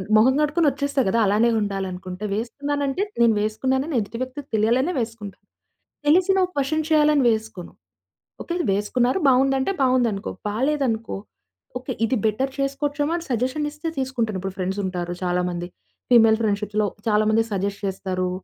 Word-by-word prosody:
మొహం 235 +5 +6
గడుక్కుని 300 +1 +2
వచ్చేస్తా 280 0 -1
గదా! 230 +4 +2
అలానే 215 +4 +3
ఉండాలనుకుంటే, 190 -1 -4
వేసుకున్నానంటే 285 - -2 0.2
నేను 230 -1 +5
వేసుకున్నానని 265 +7 -1
ఎదుటి 215 +2 -5
వ్యక్తికి 260 +2 -5
తెలియాలనే 245 +10 +2
వేసుకుంటాను. 220 -4 -6 0.6
తెలిసినా 375 +4 +4
క్వషన్ 300 +3 0
చేయాలని 300 -3 +4
వేసుకోను. 220 -5 -3 0.7
ఓకే. 345 - -4 0.2
వేసుకున్నారు 245 - +1
బావుందంటే, 270 +5 +3
బావుందనుకో. 245 -6 +1 0.2
బాలేదనుకో, 240 0 -1 0.6
ఓకే. 255 +1 -5
ఇది 235 - 0
బెటర్ 260 +6 0
చేసుకోవచ్చేమో 290 +2 -1
అని 340 - -7
సజెషన్ 260 +6 0
ఇస్తే 300 +2 -5
తీసుకుంటాను. 235 -6 -1
ఇప్పుడు 195 -1 -5
ఫ్రెండ్స్ 190 +2 -2
ఉంటారు 175 -1 -3
చాలా 180 0 0
మంది 175 0 -5 0.4
ఫీమేల్ 225 -2 +6
ఫ్రెండ్షిప్‌లో 210 0 0 0.2
చాలా 210 0 +3
మంది 225 +1 +3
సజెస్ట్ 200 +1 -2
చేస్తారు, 185 -1 -2
235 Hz, 135 wpm, -23 LUFS, 205-280 Hz, 0.7 s, మొహం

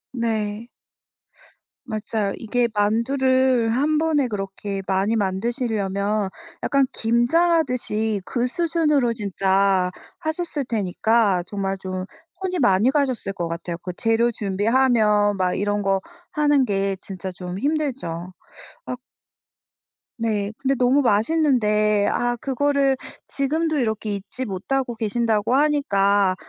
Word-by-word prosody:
네. 220 -1 -2 1.2
맞아요. 215 -3 -2
이게 235 +2 0
만두를 255 +3 +2
1 300 +4 +2
번에 310 -4 +2
그렇게 195 -1 -4
많이 195 +4 +1
만드시려면 205 -1 -1 0.3
약간 275 -1 +3
김장하듯이 240 - +1
그 245 0 -1
수준으로 300 -5 +1
진짜 195 -3 +1 0.3
하셨을 315 -2 -2
테니까 210 -2 +1
정말 195 -1 -3
좀 185 -1 -4 0.4
손이 365 -2 -2
많이 210 -1 +4
가셨을 265 -8 0
것 175 -2 -3
같아요. 170 +1 -4
그 180 - -4
재료 230 +1 +2
준비하면 210 0 +2
막 180 -1 +1
이런 205 +1 0
거 195 -1 +1 0.3
하는 295 -2 +3
게 195 -2 0
진짜 190 -1 -6
좀 180 0 -6
힘들죠. 250 - -2 0.5
아 250 - -3 1.2
네. 210 -3 -1
근데 275 0 +1
너무 255 +4 +3
맛있는데 215 -4 +2
아 240 0 0
그거를 275 +1 +1 0.3
지금도 310 +3 0
이렇게 220 -3 -1
잊지 225 +6 -6
못하고 240 +6 -2
계신다고 225 +1 0
하니까 200 -10 +2
225 Hz, 240 characters per minute, -22 LUFS, 200-265 Hz, 1.2 s, 많이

